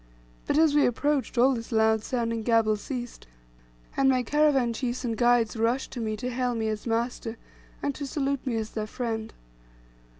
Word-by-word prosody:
But - - +1
as 315 -2 +5
we 295 -1 +5
approached, 275 +2 0
all 260 +3 +5
this 230 0 -6
loud 220 -1 +3
sounding 230 -2 -1
gabble 225 -1 +3
ceased, 240 - -6 0.7
and 270 0 +4
my 255 -1 +2
caravan 275 -3 +2
chiefs 250 +1 -3
and 230 -2 -1
guides 240 -1 +3
rushed 230 +4 0
to 245 - -6
me 215 -2 -2
to 250 +4 -3
hail 250 0 -1
me 220 -1 -1
as 215 +2 -4
"master," 230 0 -2 0.5
and 285 - 0
to 280 +1 -5
salute 275 -1 -1
me 240 - 0
as 220 -1 -3
their 215 -1 -3
friend. 225 -2 -4
240 Hz, 180 wpm, -27 LUFS, 225-265 Hz, 0.7 s, as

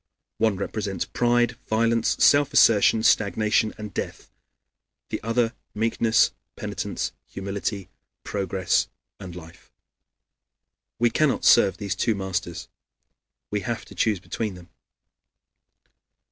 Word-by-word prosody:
One 110 -3 +2
represents 100 0 -3
pride, 120 0 +1
violence, 115 +1 +2
self 145 0 +4
assertion, 110 0 +5
stagnation, 110 +2 +2
and 105 -1 -8
death; - - -6 0.8
the - - -4
other, 115 +1 0 0.2
meekness, 110 -1 +2 0.2
penitence, - - -4 0.2
humility, 100 0 -4 0.4
progress, 95 -2 0 0.3
and 90 -3 -9
life. 80 -2 -13 1.3
We 120 0 +2
cannot 150 +3 +1
serve 100 - +5
these 100 -3 -3
two 110 +3 +1
masters; 95 -3 -4 0.8
we 105 - 0
have 115 +3 -4
to - - -13
choose 105 -4 +1
between 105 +2 -4
them. 90 -1 -14
105 Hz, 105 wpm, -24 LUFS, 95-115 Hz, 1.3 s, assertion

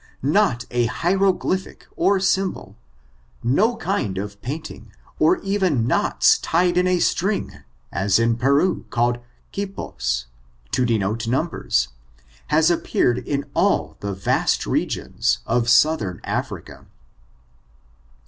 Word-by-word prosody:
Not 145 - +2
a 120 -1 +1
hie 175 +10 0
roglyphic 190 -1 0
or 195 0 +2
symbol 190 0 -1 0.4
— - - -34 0.2
no 225 +4 +3
kind 170 - -2
of 100 +1 -6
painting, 150 +6 -7 0.3
or 360 - +4
even 190 - +1
knots - - +3
tied 175 +1 +1
in 180 0 +3
a 185 0 +3
string, 195 +4 -1 0.3
as 95 +2 +2
in 115 0 +2
Peru^ 140 +9 +1
called 120 +1 +1 0.3
quiposj 65 - -3 0.5
to 125 - +1
denote 110 +1 -1
numbers, 120 - 0 0.6
has 160 +2 +3
appeared 125 -7 +1
in 140 +3 -3
all - - +1
the 100 -1 -4
vast 95 - +1
regions, - - 0
of 120 0 +1
Southern 120 - +3
Africa. - - -5
140 Hz, 120 wpm, -22 LUFS, 115-185 Hz, 0.6 s, or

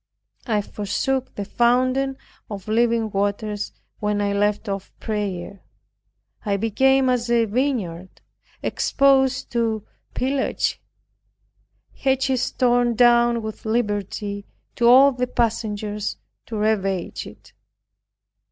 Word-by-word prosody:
I 210 -3 +1
forsook 255 +7 -2
the 200 - -4
fountain 255 +4 +2 0.3
of 200 -2 -7
living 230 0 +2
water 205 +2 -1 0.4
when 210 0 0
I 200 0 0
left 205 +2 0
off 195 -1 -4
prayer. 200 -3 -4 0.8
I 200 -2 0
became 265 +5 +3
as 245 -1 0
a 235 -1 +3
vineyard 205 -7 -2 0.4
exposed 270 -1 +2
to 225 -3 -1 0.3
pillage, 270 +1 -1 1.1
hedges 265 -1 +1
torn 245 -1 +2
down 240 -1 +4
with 220 0 -6
liberty 205 -2 -2 0.3
to 235 - +3
all 265 +3 +8
the 250 -1 -2
passengers 210 -3 -2 0.3
to 225 - -4
ravage 195 -4 -1
it. - - -15
225 Hz, 105 wpm, -22 LUFS, 205-250 Hz, 1.1 s, all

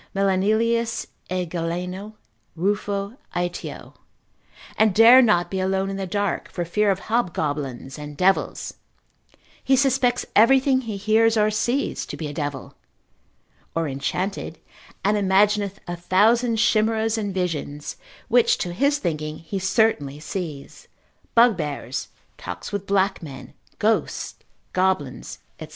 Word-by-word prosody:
(Melanelius 220 +4 +1 0.2
e 180 0 -1
Galeno, 180 +4 -4 0.4
Ruffo, 200 +4 -1 0.2
Aetio,) 175 0 -4 0.8
and 215 -3 +3
dare 235 +4 +9
not 210 -8 +2
be 190 - -1
alone 190 +1 0
in - - -4
the 195 -1 -3
dark 205 +2 -2
for 175 - -3
fear 210 +5 +1
of 195 -1 0
hobgoblins 150 - -2
and 150 -1 -8
devils: 190 +3 +1 0.9
he 265 - +4
suspects 260 -2 +2
everything 260 +4 +5
he 220 -5 -5
hears 220 +3 +3
or 215 0 +3
sees 240 +6 -1
to - - -6
be 160 - -5
a 145 - -5
devil, 145 -3 -4 1.0
or 165 -1 0
enchanted, 165 +8 -3 0.5
and 210 +1 +3
imagineth 200 0 +2
a 175 - -3
thousand 225 +7 +3
chimeras 220 0 +2
and 210 -3 -2
visions, 160 -6 -3 0.3
which 240 0 +4
to 175 - -3
his 280 +9 +2
thinking 155 - -3
he 180 +4 -5
certainly 190 - +1
sees, 155 -4 -6 0.5
bugbears, 150 - +2 0.3
talks 90 0 -7
with 200 -1 -4
black 195 0 +1
men, 140 -6 -10 0.2
ghosts, - - 0 0.4
goblins, 185 -8 -1 0.2
&c. - - -7
195 Hz, 125 wpm, -23 LUFS, 170-220 Hz, 1.0 s, dare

